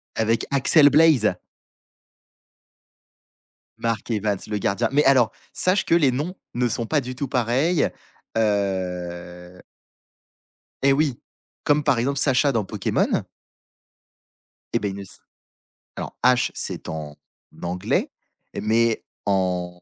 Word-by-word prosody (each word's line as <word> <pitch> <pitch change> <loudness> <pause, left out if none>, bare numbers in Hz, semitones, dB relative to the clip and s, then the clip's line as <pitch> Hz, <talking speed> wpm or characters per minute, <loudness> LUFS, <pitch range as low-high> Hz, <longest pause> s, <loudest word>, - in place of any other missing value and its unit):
Avec 115 +1 +1
Axel 145 +2 +5
Blaze. 145 - +5 2.4
Mark 115 -1 -2
Evans, 105 -2 0
le 105 -1 -2
gardien 105 +4 0
mais 145 +2 +3
alors, 130 -5 +5 0.2
sache 185 +2 +1
que 165 - +3
les 145 -6 +4
noms 155 +9 -3 0.2
ne 120 0 +1
sont 115 0 -2
pas 150 +3 +1
du 125 0 -6
tout 140 +2 -3
pareils, 130 +8 +1 0.5
heu 90 -4 -2 1.2
Eh 140 - +5
oui, 145 -4 0 0.5
comme 150 0 +3
par 125 -5 +2
exemple 140 +3 0
Sacha 140 +1 +3
dans 115 -4 0
Pokémon. - - 0 1.5
Et - - +2
beh, 100 -1 -2
il 95 - -6
ne 100 - -7
s' 95 - -12 0.8
alors - - -6
Ash 125 0 +4
c'est - - -5
en 75 -2 -6 0.5
anglais, 90 +1 -1 0.5
mais 115 +1 +1 0.2
en 90 -2 -1
115 Hz, 120 wpm, -23 LUFS, 95-140 Hz, 2.4 s, Axel